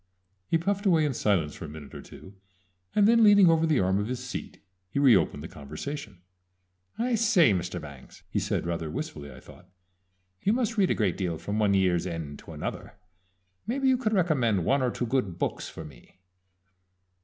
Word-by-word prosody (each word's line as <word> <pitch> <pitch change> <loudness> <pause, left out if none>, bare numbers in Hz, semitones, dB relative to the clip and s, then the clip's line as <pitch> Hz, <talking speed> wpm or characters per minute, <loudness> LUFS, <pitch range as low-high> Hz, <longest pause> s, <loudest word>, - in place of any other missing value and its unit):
He 165 - +2
puffed 200 +4 -1
away 165 -4 +4
in 145 - 0
silence 95 -10 0
for - - -8
a - - -8
minute 75 -2 -11
or - - -8
two, 95 - -13 0.6
and 205 -1 +5
then 230 0 +5
leaning 205 -4 +7
over 165 0 +2
the 155 -4 +2
arm 95 +1 +1
of 105 - -2
his 125 +1 -3
seat 125 - -7 0.3
he - - -5
re 135 -5 +6
opened 75 -5 0
the - - -6
conversation. 90 - -8 0.7
"I 245 +2 0
say, 210 - +4
Mr. 90 -1 -3
Bangs," 70 -4 -12
he - - -1
said, - - -2
rather 85 -2 -3
wistfully, 75 -1 -6
I 65 - -12
thought, - - -16 0.7
"you 205 - +2
must 235 -2 -1
read 195 -4 +2
a - - +2
great 100 -6 0
deal 90 -4 -2
from 105 +6 -3
one 100 -2 +3
year's 90 -2 +2
end 80 -4 -6
to - - -12
another - - -6 0.7
maybe 265 +3 0
you 260 - +4
could 225 -4 -1
recommend 130 - +1
one 140 +1 +2
or 125 - +1
two 120 - -3
good 110 -8 -1
books - - -3
for 80 - -9
me?" 70 +5 -16
110 Hz, 200 wpm, -27 LUFS, -, 0.7 s, leaning